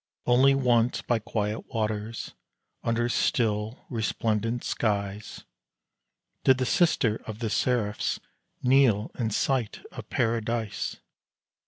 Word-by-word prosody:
Only 130 +3 +5
once 120 -3 +2
by 120 -2 +1
quiet 105 -1 -3
waters, 110 -1 -3 0.5
under 115 +1 0
still, 110 -1 0
resplendent 115 0 -1
skies, 100 -1 -2 1.0
Did 130 -1 +5
the 130 - 0
sister 125 -8 +2
of 110 -2 -5
the 110 -2 -3
seraphs 110 -5 0 0.4
kneel 125 -5 +4
in 115 -2 +1
sight 120 +1 0
of - - -9
Paradise! 115 -4 -1
115 Hz, 105 wpm, -27 LUFS, 105-120 Hz, 1.0 s, Only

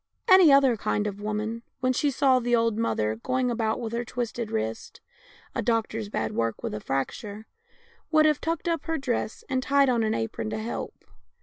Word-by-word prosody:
Any 375 -5 +8
other 275 -3 +5
kind 210 0 -1
of 205 -1 -4
a - - -10
woman, 215 +2 -3 0.2
when 255 0 +1
she 290 +3 +1
saw 265 -1 +3
the 240 0 +2
old 230 -1 +2
mother 110 - 0
going 255 - 0
about 225 -1 -1
with 230 -2 -5
her 235 +1 -1
twisted 235 -2 -4
wrist 110 +1 -4 0.3
— - - -26
a - - -1
doctor's 225 -2 -1
bad 110 - -2
work 115 -1 -2
with - - -3
a 105 - -3
fracture 200 - -4 0.3
— 470 -1 -33
would 310 -1 +5
have 305 -2 +2
tucked 330 +1 -2
up 335 -3 -1
her 325 -1 -1
dress, 245 -5 -2
and 260 -2 0
tied 275 +1 +3
on 240 -2 +2
an 220 -1 +1
apron 110 -1 -3
to 110 - -3
help. 115 +2 -5
230 Hz, 210 wpm, -26 LUFS, 210-270 Hz, 0.3 s, Any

